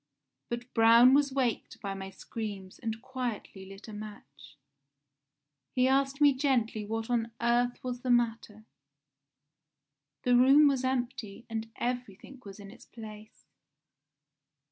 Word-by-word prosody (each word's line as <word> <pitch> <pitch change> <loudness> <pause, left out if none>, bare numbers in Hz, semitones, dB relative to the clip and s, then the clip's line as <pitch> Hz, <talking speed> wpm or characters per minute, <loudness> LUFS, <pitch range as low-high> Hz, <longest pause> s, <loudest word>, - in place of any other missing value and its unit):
But 240 +1 -6
Braun 230 +2 +7
was 285 0 +3
waked 255 -4 -2
by 200 -1 -4
my 190 0 -7
screams 200 -2 -7
and 225 0 -5
quietly 245 -7 -5
lit 195 +3 -12
a 215 - -9
match. 145 -9 -11 1.2
He 255 0 +3
asked 275 +1 +1
me 290 -1 +6
gently 255 -6 0
what 225 +2 -4
on 230 -1 0
earth 240 +1 +1
was 250 -1 -4
the 255 - -4
matter. 225 -3 0 1.6
The 250 -1 +3
room 270 +4 +7
was 270 -2 +1
empty 240 -5 -3
and 225 0 -4
everything 245 +1 -5
was 200 0 -11
in 200 -1 -10
its 235 - -16
place. 215 - -12
235 Hz, 130 wpm, -30 LUFS, 210-255 Hz, 1.6 s, Braun